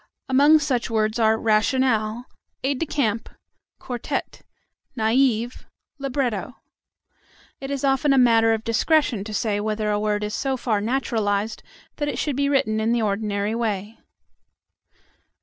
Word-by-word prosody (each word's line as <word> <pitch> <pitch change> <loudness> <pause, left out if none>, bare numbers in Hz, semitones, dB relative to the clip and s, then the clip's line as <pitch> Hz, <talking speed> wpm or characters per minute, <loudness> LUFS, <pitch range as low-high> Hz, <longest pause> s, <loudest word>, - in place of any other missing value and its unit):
Among 285 +4 +6
such 270 -6 -1
words 220 0 0
are: 220 -1 +3
rationale, 225 +1 +1 0.4
aide 270 0 0
de 330 - -2
camp, 230 -7 -1 0.5
quartette, 245 -2 -4 0.6
naïve, 235 +1 +1 0.3
libretto. 255 -4 -2 1.0
It 270 - -6
is 280 -1 -3
often 275 +2 +2
a 275 - +4
matter 230 -3 +5
of 220 0 -1
discretion 230 -1 +1
to 215 - -8
say 210 0 -1
whether 215 0 -1
a 205 - 0
word 210 0 -1
is 210 0 -3
so 270 +2 -1
far 220 -4 -1
naturalized 220 -3 -1 0.4
that 290 - -2
it 275 -4 -3
should 290 0 -1
be 280 +1 +1
written 220 -6 +1
in 225 +2 +1
the 240 - +1
ordinary 205 0 -1
way. 220 -2 -3
230 Hz, 140 wpm, -23 LUFS, 215-270 Hz, 1.0 s, Among